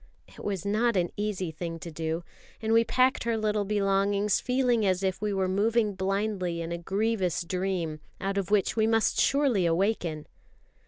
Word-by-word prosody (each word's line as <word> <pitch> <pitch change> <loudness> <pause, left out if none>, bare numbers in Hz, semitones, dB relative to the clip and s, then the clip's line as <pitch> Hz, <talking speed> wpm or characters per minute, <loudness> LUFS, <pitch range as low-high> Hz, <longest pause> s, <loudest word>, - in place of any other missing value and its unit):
It - - -13
was 195 -3 -3
not 220 +2 +1
an 175 -1 0
easy 205 -5 -2
thing 165 +1 -5
to 165 +1 -8
do; 160 +2 -3 0.4
and 220 0 0
we 230 0 +6
packed 255 +3 +2
her 230 -1 +1
little 210 -1 0
belongings 200 0 +1
feeling 250 -3 +1
as 190 -1 +1
if 190 0 -1
we 210 -1 0
were 190 -1 0
moving 210 +3 +1
blindly 190 -2 -1
in 165 0 -4
a 170 - -2
grievous 195 -1 0
dream, 180 -3 -2 0.2
out 195 +1 -1
of 195 - -4
which 205 -3 +2
we 220 -1 +2
must 225 -1 +2
surely 265 -11 +3
awaken. 170 -3 0
195 Hz, 175 wpm, -28 LUFS, 180-220 Hz, 0.4 s, we